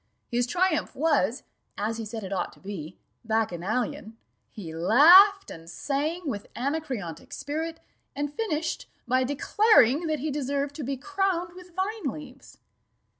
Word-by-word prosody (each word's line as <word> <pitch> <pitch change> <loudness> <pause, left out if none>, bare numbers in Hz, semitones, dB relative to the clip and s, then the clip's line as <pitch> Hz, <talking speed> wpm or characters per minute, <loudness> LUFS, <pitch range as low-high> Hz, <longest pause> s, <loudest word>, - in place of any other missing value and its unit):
His 240 +1 +1
triumph 355 +2 0
was, 280 - +1 0.3
as 220 +2 -2
he 225 - -5
said 220 0 -6
it 190 +1 -5
ought 190 - -2
to - - -20
be, 185 -4 -7 0.3
bacchanalian: 220 - -2 0.3
he 175 -8 -8
laughed 350 - +7
and 165 0 -10
sang 295 - -2
with 210 -7 -5
anacreontic 260 - -4
spirit, 320 +3 -4 0.4
and 290 +1 -3
finished 325 -6 -2 0.2
by 255 +2 +3
declaring 290 - +3
that 310 -1 0
he 300 +2 -3
deserved 280 0 -2
to 300 - -4
be 270 +1 -3
crowned 370 +1 -1
with 360 -1 -14
vine 395 +1 -2
leaves. 275 -3 -12
280 Hz, 140 wpm, -27 LUFS, 225-330 Hz, 0.4 s, laughed